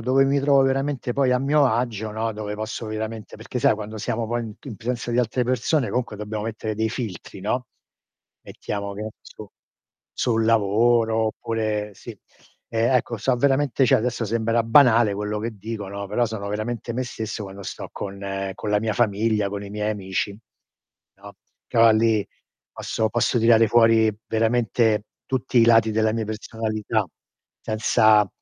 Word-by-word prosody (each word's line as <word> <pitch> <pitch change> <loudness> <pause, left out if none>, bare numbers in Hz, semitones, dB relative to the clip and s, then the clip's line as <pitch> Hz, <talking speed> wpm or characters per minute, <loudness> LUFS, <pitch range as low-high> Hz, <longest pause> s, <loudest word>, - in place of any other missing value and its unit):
dove 130 +4 +3
mi 140 +1 +2
trovo 140 -1 +4
veramente 135 -1 -1
poi 135 0 +2
a 125 - +3
mio 140 +1 +3
agio, 110 -2 -1
no, 110 +1 -2
dove 105 0 -5
posso 110 +2 -5
veramente 110 0 -5
perché 110 +3 -5
sai 130 -2 +4
quando 110 +1 -7
siamo 115 +2 -2
poi 120 +2 -1
in 110 -2 -8
in 120 -6 -8
presenza 120 +1 -3
di 120 - 0
altre 125 +1 +1
persone 130 0 0
comunque 120 -2 -2
dobbiamo 105 0 -5
mettere 110 -1 -4
dei 110 +1 0
filtri 105 -5 -6
no. 115 +5 -2 0.8
Mettiamo 100 -1 -5
che 105 - -6
ne 110 - -5
so, 105 -2 -13 0.6
sul 115 -2 0
lavoro 115 +1 +3
oppure 110 -2 -3
sì. - - -11 0.5
E 115 - -2
ecco 120 -2 +1
so 130 +4 +1
veramente 135 0 +2
cioè - - +5
adesso 120 0 -1
sembra 115 +1 +1
banale 115 -2 +5
quello 105 +1 -3
che 110 0 -4
dico, 105 0 -5
no, 100 0 -5
però 120 +5 +1
sono 105 -2 -5
veramente 110 +2 -4
me 130 +1 -1
stesso 110 -3 -5
quando 100 0 -9
sto - - -7
con 95 -1 -5
con 105 - -5
la 105 0 +2
mia 110 -2 -1
famiglia, 105 -2 +1
con 100 0 -5
i - - -8
miei 105 0 -2
amici, 100 0 -3 0.8
no, - - -13 0.3
però 115 0 +5
lì 110 -1 +2 0.5
posso 110 0 -2
posso 120 +1 +1
tirare 115 0 +5
fuori 115 -1 +4
veramente 110 -1 +1 0.3
tutti 130 0 -1
i 115 - +7
lati 115 -1 +5
della 110 0 +2
mia 115 0 -2
personalità, 110 -1 -2 0.5
senza 110 -1 +3
110 Hz, 170 wpm, -23 LUFS, 105-120 Hz, 0.8 s, i